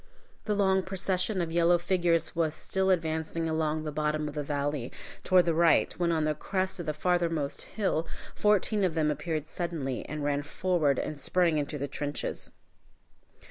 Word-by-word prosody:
The 210 Hz, -, 0 dB
long 190 Hz, -1 st, +3 dB
procession 190 Hz, +1 st, 0 dB
of 165 Hz, -1 st, -2 dB
yellow 170 Hz, +1 st, +4 dB
figures 175 Hz, -1 st, +1 dB
was 160 Hz, -2 st, 0 dB
still 190 Hz, 0 st, -1 dB
advancing 165 Hz, -2 st, 0 dB
along 160 Hz, -1 st, 0 dB
the 155 Hz, -, -3 dB
bottom 150 Hz, 0 st, -1 dB
of 150 Hz, -, -5 dB
the 150 Hz, -, -2 dB
valley, 145 Hz, -3 st, -2 dB, 0.3 s
toward 185 Hz, -1 st, +5 dB
the 170 Hz, -, +2 dB
right, 165 Hz, 0 st, +4 dB
when 170 Hz, -1 st, +2 dB
on 160 Hz, -2 st, +1 dB
the 155 Hz, 0 st, +1 dB
crest 190 Hz, +4 st, -2 dB
of 170 Hz, -, -5 dB
the 155 Hz, -, 0 dB
farthermost 165 Hz, -4 st, 0 dB, 0.2 s
hill 180 Hz, -6 st, 0 dB, 0.3 s
fourteen 210 Hz, 0 st, +2 dB
of 175 Hz, -3 st, +1 dB
them 155 Hz, -2 st, +2 dB
appeared 155 Hz, +1 st, -3 dB
suddenly, 155 Hz, -7 st, -3 dB
and 150 Hz, -1 st, -4 dB
ran 145 Hz, 0 st, +1 dB
forward 150 Hz, -2 st, +1 dB
and 150 Hz, -, -3 dB
sprang 170 Hz, +1 st, +2 dB
into 145 Hz, +1 st, -3 dB
the 140 Hz, 0 st, -3 dB
trenches. 145 Hz, +1 st, -4 dB
165 Hz, 175 wpm, -29 LUFS, 150-180 Hz, 0.3 s, toward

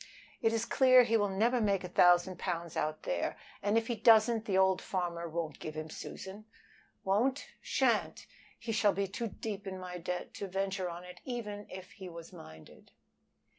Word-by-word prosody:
"It 225 Hz, -, +3 dB
is 225 Hz, 0 st, 0 dB
clear 255 Hz, -1 st, +6 dB
he 230 Hz, -1 st, +1 dB
will 205 Hz, -2 st, +2 dB
never 230 Hz, +6 st, +2 dB
make 200 Hz, -3 st, +1 dB
a -, -, -4 dB
thousand 175 Hz, 0 st, +4 dB
pounds 170 Hz, -3 st, -3 dB
out 155 Hz, 0 st, -2 dB
there, 85 Hz, -1 st, -2 dB, 0.2 s
and 205 Hz, +2 st, +2 dB
if 230 Hz, -, +1 dB
he 240 Hz, -, -1 dB
doesn't 220 Hz, +1 st, +5 dB
the 195 Hz, -3 st, +1 dB
old 190 Hz, -1 st, +4 dB
farmer 170 Hz, -2 st, -3 dB
won't 160 Hz, -2 st, -4 dB
give 155 Hz, 0 st, -6 dB
him 155 Hz, 0 st, -5 dB
Susan. 195 Hz, +6 st, -8 dB, 0.6 s
Won't? 220 Hz, +8 st, +2 dB
He -, -, -8 dB, 0.2 s
shan't! -, -, +1 dB, 0.3 s
He 230 Hz, -1 st, -5 dB
shall 210 Hz, -2 st, +3 dB
be 200 Hz, 0 st, -1 dB
too 230 Hz, +5 st, -4 dB
deep 205 Hz, -1 st, -6 dB
in 190 Hz, 0 st, -4 dB
my 180 Hz, -1 st, -6 dB
debt 180 Hz, +1 st, -4 dB
to 200 Hz, -, -5 dB
venture 190 Hz, -1 st, -2 dB
on 170 Hz, +1 st, -7 dB
it 180 Hz, 0 st, -12 dB
even 210 Hz, -5 st, -5 dB
if 185 Hz, 0 st, -9 dB
he 190 Hz, -2 st, -9 dB
was 170 Hz, -1 st, -10 dB
minded." 80 Hz, 0 st, -13 dB
195 Hz, 190 wpm, -32 LUFS, 175-220 Hz, 0.6 s, clear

